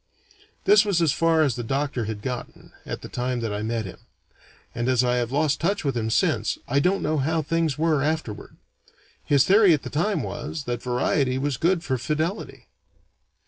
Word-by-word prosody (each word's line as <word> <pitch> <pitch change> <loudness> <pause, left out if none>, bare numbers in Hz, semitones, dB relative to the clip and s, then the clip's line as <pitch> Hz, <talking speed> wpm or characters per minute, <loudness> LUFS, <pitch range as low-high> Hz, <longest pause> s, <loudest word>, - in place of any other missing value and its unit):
This 205 +1 +6
was 200 -5 +1
as 165 -4 +3
far 165 -1 +3
as 135 -6 +1
the 120 - -4
doctor 135 -1 -1
had 105 -1 -5
gotten, 125 -2 -6 0.2
at - - -5
the - - -6
time 125 0 -2
that 110 -2 -2
I 105 - -3
met 110 0 -2
him; 95 - -9 0.7
and 120 +2 -1
as 130 -1 +3
I 125 0 +1
have 120 -1 -1
lost 145 +1 +1
touch 195 +4 0
with 135 -3 0
him 110 -2 -1
since, 115 - +1
I 140 - +2
don't 185 +7 +1
know 155 +1 0
how 160 +3 0
things 160 -2 0
were 155 -2 +2
afterward. 150 -8 -3 0.7
His 140 -2 +4
theory 195 -3 +6
at 145 - -7
the - - -7
time 170 +2 0
was, 150 0 -5
that 120 -2 -3
variety 130 +1 0
was 140 0 -1
good 175 0 +1
for 130 -6 -1
fidelity. 155 - -3
145 Hz, 195 wpm, -24 LUFS, 125-165 Hz, 0.7 s, This